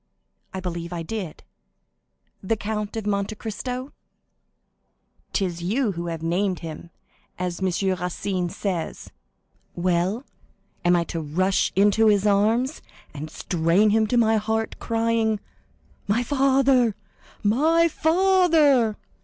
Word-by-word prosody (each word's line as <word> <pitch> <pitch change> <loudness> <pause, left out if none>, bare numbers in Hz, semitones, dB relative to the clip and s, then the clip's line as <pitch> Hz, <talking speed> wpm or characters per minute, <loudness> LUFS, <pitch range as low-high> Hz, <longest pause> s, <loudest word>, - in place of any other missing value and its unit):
"I 190 - -5
believe 170 -2 -5
I 170 -1 -4
did." 190 -3 -6 1.0
"The 210 +4 0
Count 210 0 -4
of 220 - -4
Monte 200 +1 -1
Cristo?" 250 +5 -5 1.4
"'Tis 180 -4 -1
you 215 +6 0
who 170 -1 -5
have 165 -1 -5
named 180 +3 0
him, 165 0 -8 0.5
as 180 -1 -3
M. 190 -1 0 0.3
Racine 180 0 -2
says. 180 -3 -4 0.6
Well, 180 +7 0 0.6
am 175 0 +4
I 170 - +2
to 165 -1 -4
rush 185 +6 +1
into 205 +3 +4
his 205 -1 +3
arms, 220 +7 +2 0.3
and 150 +2 -6
strain 175 +6 +2
him 220 0 +3
to 245 - +1
my 225 -1 +4
heart, 220 +1 -2
crying, 225 -1 0 0.7
'My 220 +4 +1
father, 265 -3 +3 0.5
my 315 +11 +3
father! 320 - +3
210 Hz, 120 wpm, -24 LUFS, 180-230 Hz, 1.4 s, am